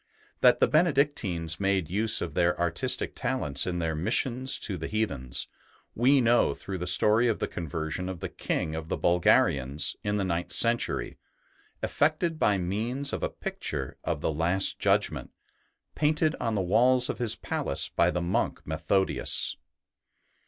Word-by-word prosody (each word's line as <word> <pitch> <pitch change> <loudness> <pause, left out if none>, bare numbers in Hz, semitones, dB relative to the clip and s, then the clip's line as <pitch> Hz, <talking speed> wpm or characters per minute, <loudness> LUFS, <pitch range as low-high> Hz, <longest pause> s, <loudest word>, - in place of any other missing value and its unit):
That - - +5
the - - +3
Benedictines 140 - +1
made 95 -4 +1
use 105 +6 +1
of - - -5
their 90 -1 +1
artistic 85 -2 +1
talents 70 +2 -1
in 90 -1 -2
their 80 -2 -1
missions 120 - 0
to 100 - -3
the 80 -2 -5
heathens, 70 - -2 0.5
we 135 +4 +4
know 120 - +3
through 95 -2 -6
the 90 - -3
story 110 +6 +4
of 115 - +1
the - - -2
conversion 80 +2 -4
of 95 -2 -6
the 95 - -4
King 80 -2 -3
of 80 0 -6
the - - -1
Bulgarians, 75 -5 +2
in 105 0 -1
the 100 - 0
ninth 85 -2 -2
century, 115 0 0 0.6
effected 155 +2 0
by 105 -2 +3
means 115 +10 -2
of - - -3
a - - -1
picture - - -5
of - - -2
the 80 - -1
Last 85 +5 +1
Judgment, - - 0 0.6
painted 155 +1 +1
on 115 -2 -1
the 100 - +1
walls 125 +7 +3
of - - -4
his 120 -3 +1
palace - - -2
by 85 - +2
the 90 0 -2
monk 85 - -1
Methodius. 80 +5 0
95 Hz, 160 wpm, -27 LUFS, 85-120 Hz, 0.6 s, That